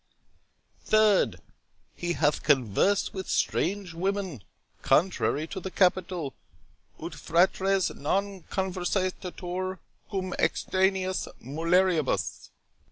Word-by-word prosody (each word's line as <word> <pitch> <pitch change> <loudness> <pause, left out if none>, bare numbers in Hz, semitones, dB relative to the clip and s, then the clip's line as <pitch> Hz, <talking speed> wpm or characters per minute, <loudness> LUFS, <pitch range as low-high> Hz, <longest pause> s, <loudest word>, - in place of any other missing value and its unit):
—3d, 210 - +4 0.6
He 175 0 -2
hath 150 -3 +1
conversed 140 - +2
with 190 -1 -5
strange 190 -1 0
women, 185 - -2 0.4
contrary 160 -3 +2
to 190 +4 -6
the 190 - -5
capital, 180 -6 +1 0.7
'Ut - - -6
fratres 190 +2 +2
non 195 +5 -1
conversantur 185 0 -2 0.3
cum 185 -3 -3
extraneis 190 0 +1
mulieribus'. 160 - +1
185 Hz, 85 wpm, -28 LUFS, 165-190 Hz, 0.7 s, 3d